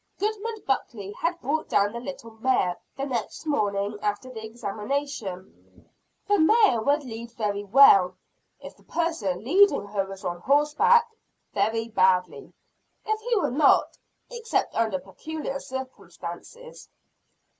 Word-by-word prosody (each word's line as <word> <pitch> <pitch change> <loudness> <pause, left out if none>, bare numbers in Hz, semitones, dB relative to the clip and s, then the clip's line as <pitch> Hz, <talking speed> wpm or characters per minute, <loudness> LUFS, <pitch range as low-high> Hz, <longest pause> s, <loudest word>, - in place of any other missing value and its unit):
Goodman 435 +1 -3
Buckley 220 -6 -2
had 335 +10 -2
brought 310 +3 -2
down 200 +1 +2
the 235 - -4
little 260 -2 -8
mare, 220 -6 0 0.2
the 275 - -2
next 250 +2 -4
morning 205 -7 -1
after 210 +5 -2
the 220 -2 -7
examination. 220 -2 -6 0.4
The 410 0 +3
mare 405 - +4
would 285 +5 +1
lead 235 -2 -7
very 205 -3 -2
well, 195 -5 +6 0.4
if - - -11
the - - -25
person 220 - -2
leading 380 - +4
her 200 -1 -2
was 195 0 -9
on 175 0 -3
horseback 300 - +4 0.5
very 220 +3 0
badly, 185 -4 +1 0.5
if 435 0 0
he 475 +1 0
were 390 - +1
not, 285 +2 +3 0.4
except 470 -1 -1
under 220 -4 0
peculiar 275 - -6
circumstances. 260 - -9
240 Hz, 130 wpm, -26 LUFS, 200-310 Hz, 0.5 s, well